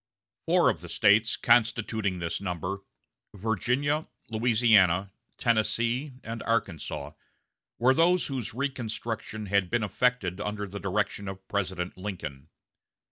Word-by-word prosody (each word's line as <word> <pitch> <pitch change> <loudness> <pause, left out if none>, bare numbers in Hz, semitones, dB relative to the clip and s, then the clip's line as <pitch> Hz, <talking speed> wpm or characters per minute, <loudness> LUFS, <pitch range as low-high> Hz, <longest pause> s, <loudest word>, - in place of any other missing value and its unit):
Four - - +5
of - - -8
the - - -9
States 110 +3 +4
constituting 110 -4 +2
this 85 +1 -3
number 90 +1 -3 0.6
Virginia, 125 - 0 0.2
Louisiana, 110 -5 +4 0.3
Tennessee, 120 +4 +1
and 115 0 -5
Arkansas 85 -10 -2 0.7
were 125 +3 +4
those 175 +5 +4
whose 130 -6 -4
reconstruction 115 -4 -3
had 100 -2 +1
been 120 +2 +1
effected 105 -4 0
under 105 0 -3
the 100 +1 -7
direction 100 0 -1
of 95 0 -8
President 95 -3 -2
Lincoln. 80 -8 -6
105 Hz, 115 wpm, -28 LUFS, 95-120 Hz, 0.7 s, Four